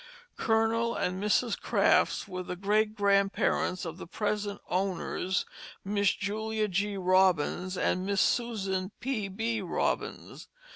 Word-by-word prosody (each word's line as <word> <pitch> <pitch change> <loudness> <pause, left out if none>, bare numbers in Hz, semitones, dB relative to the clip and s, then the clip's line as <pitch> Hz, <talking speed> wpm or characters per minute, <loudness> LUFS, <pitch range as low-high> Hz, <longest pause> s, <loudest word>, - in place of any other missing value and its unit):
Colonel 225 +1 +1
and 185 +1 -2
Mrs. 210 +3 +1
Crafts - - +2
were 185 -2 -5
the 180 0 -5
great 210 +3 +1
grandparents 200 -2 +1
of 165 +2 -6
the - - -8
present 205 +1 -2
owners, 185 0 -1 0.4
Miss 200 0 +2
Julia 215 +2 -2
G. 200 +2 -1
Robins 185 -1 +2
and 185 - +1
Miss 200 0 0
Susan 195 -6 0
P. 245 -6 -2
B. 225 +3 -2
Robins. 180 - -3
200 Hz, 125 wpm, -29 LUFS, 185-215 Hz, 0.4 s, Crafts